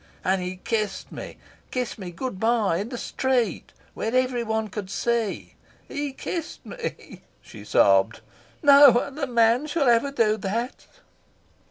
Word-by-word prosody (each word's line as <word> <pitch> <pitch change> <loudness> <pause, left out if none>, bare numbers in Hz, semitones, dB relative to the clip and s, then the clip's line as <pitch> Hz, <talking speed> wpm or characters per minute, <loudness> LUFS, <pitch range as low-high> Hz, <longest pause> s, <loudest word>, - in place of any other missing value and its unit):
And 190 0 +1
he 180 +1 -4
kissed 210 0 -3
me - - -8 0.3
kissed 250 -3 -3
me 185 -3 -6
good 190 +3 -5
bye 220 -6 +2
in 205 +5 -4
the 245 - -5
street, 245 -6 -1 0.2
where 225 +3 -3
every 255 -1 +1
one 220 -1 -1
could 200 -1 -6
see. 230 0 -2 0.3
He 285 0 -3
kissed 320 +4 -6
me," 475 -1 -7 0.2
she - - -13
sobbed. - - +3 0.4
"No 280 -3 +8
other 280 +2 -3
man 235 +3 +3
shall 290 -2 0
ever 235 +3 +4
do 225 -6 +1
that." 225 +5 -4
235 Hz, 145 wpm, -24 LUFS, 215-265 Hz, 0.4 s, No